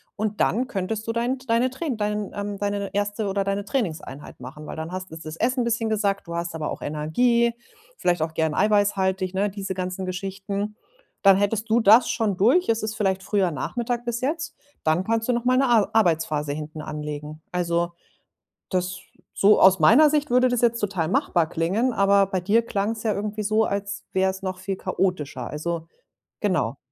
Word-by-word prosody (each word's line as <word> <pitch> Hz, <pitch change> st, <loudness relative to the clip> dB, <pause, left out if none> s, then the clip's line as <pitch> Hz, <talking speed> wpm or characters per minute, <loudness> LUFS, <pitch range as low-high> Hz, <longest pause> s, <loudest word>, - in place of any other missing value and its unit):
Und 215 Hz, -1 st, -3 dB
dann 250 Hz, +4 st, +1 dB
könntest 215 Hz, 0 st, -3 dB
du 230 Hz, -, -1 dB
dein 240 Hz, +3 st, -1 dB
deine 235 Hz, +2 st, +2 dB
Trai 295 Hz, +6 st, -5 dB
dein, 210 Hz, -1 st, -2 dB
ähm 205 Hz, 0 st, -4 dB
deine 200 Hz, -1 st, -2 dB
1. 205 Hz, +1 st, -1 dB
oder 195 Hz, 0 st, 0 dB
deine 195 Hz, +1 st, -2 dB
Trainingseinheit 165 Hz, -, -4 dB
machen. 150 Hz, +4 st, -9 dB
Weil -, -, -6 dB
dann 160 Hz, +1 st, -5 dB
hast 185 Hz, -2 st, -6 dB
ist 160 Hz, 0 st, -9 dB
das 155 Hz, 0 st, -6 dB
Essen 250 Hz, +4 st, +1 dB
'n -, -, +1 dB
bisschen 230 Hz, -1 st, 0 dB
gesackt, 200 Hz, -3 st, 0 dB
du 170 Hz, -, -5 dB
hast 170 Hz, 0 st, -3 dB
aber 155 Hz, -2 st, -3 dB
auch -, -, -6 dB
Energie, 235 Hz, +11 st, +1 dB, 0.4 s
vielleicht 175 Hz, -2 st, +1 dB
auch 160 Hz, 0 st, -2 dB
gerne 160 Hz, -2 st, 0 dB
eiweißhaltig, 195 Hz, -3 st, +2 dB
ne? 200 Hz, +2 st, +1 dB
Diese 195 Hz, -1 st, -5 dB
ganzen 185 Hz, 0 st, -4 dB
Geschichten. 195 Hz, +2 st, -4 dB, 0.5 s
Dann 195 Hz, -1 st, +7 dB
hättest 210 Hz, +2 st, 0 dB
du 225 Hz, +2 st, +4 dB
das 220 Hz, +3 st, +6 dB
schon 215 Hz, -4 st, 0 dB
durch, 255 Hz, -, +3 dB
es 225 Hz, 0 st, +2 dB
ist 215 Hz, 0 st, -3 dB
vielleicht 190 Hz, -3 st, 0 dB
früher 195 Hz, -4 st, +1 dB
Nachmittag 240 Hz, -, -3 dB
bis 240 Hz, 0 st, -2 dB
jetzt, 315 Hz, +5 st, -2 dB, 0.3 s
dann 160 Hz, +3 st, +2 dB
kannst 225 Hz, +3 st, 0 dB
du -, -, +4 dB
nochmal 245 Hz, +2 st, +2 dB
'ne 270 Hz, +1 st, +3 dB
A 230 Hz, -4 st, +4 dB
Arbeitsphase 160 Hz, -7 st, +1 dB
hinten 155 Hz, +1 st, -6 dB
anlegen. 150 Hz, 0 st, -6 dB
Also, 170 Hz, -1 st, 0 dB, 0.8 s
das 185 Hz, 0 st, -2 dB, 0.3 s
so 205 Hz, +2 st, +5 dB
aus 190 Hz, 0 st, +7 dB
meiner 250 Hz, -, +7 dB
Sicht 300 Hz, -1 st, 0 dB
würde 250 Hz, +1 st, +4 dB
das 245 Hz, -1 st, 0 dB
jetzt 235 Hz, -1 st, +2 dB
total 190 Hz, -6 st, -1 dB
machbar 180 Hz, -, +1 dB
klingen, 190 Hz, +10 st, 0 dB
aber 200 Hz, -1 st, +4 dB
bei 190 Hz, -1 st, -2 dB
dir 210 Hz, +6 st, +3 dB
klang 205 Hz, -1 st, -1 dB
es 220 Hz, -1 st, -7 dB
ja 220 Hz, -, +2 dB
irgendwie 210 Hz, +1 st, -3 dB
so, 215 Hz, +2 st, +2 dB
als 200 Hz, 0 st, -3 dB
wäre 190 Hz, 0 st, +2 dB
es 190 Hz, +1 st, -8 dB
noch 185 Hz, -1 st, -3 dB
viel 190 Hz, +1 st, -4 dB
chaotischer. 150 Hz, -11 st, -2 dB
Also 165 Hz, +2 st, -3 dB, 0.5 s
genau. -, -, 0 dB
200 Hz, 195 wpm, -24 LUFS, 180-225 Hz, 0.8 s, Dann